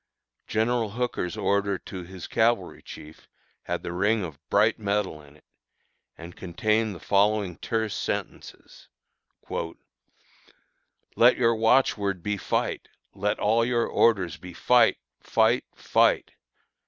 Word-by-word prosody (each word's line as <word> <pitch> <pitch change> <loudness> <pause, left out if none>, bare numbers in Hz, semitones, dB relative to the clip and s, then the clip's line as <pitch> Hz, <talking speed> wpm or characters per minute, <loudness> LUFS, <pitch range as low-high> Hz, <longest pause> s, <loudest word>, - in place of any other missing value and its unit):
General 115 0 0
Hooker's 120 -5 -3
order 100 -1 0
to 95 +1 -8
his 90 0 -9
cavalry 115 +1 0
chief 75 +1 -12 0.4
had - - -3
the 85 - -4
ring 100 +4 +1
of 80 -6 -7
bright - - +3
metal 100 -6 -2
in 75 0 -18
it, 75 - -23 0.7
and 85 +1 -10
contained 105 +4 -1
the - - -10
following 100 -1 +1
terse 110 -2 -2
sentences: - - -6 2.3
"Let 120 +2 +5
your 115 -2 +3
watchword 110 -5 +2
be 105 0 -1
fight, - - -2 0.3
and 95 - -18
let 105 +1 +1
all 115 +2 +2
your 120 0 +1
orders 95 -8 +2
be 90 -1 -11
fight! 125 +7 +4 0.2
FIGHT! - - +2
FIGHT! - - +2
105 Hz, 125 wpm, -26 LUFS, 90-115 Hz, 2.3 s, Let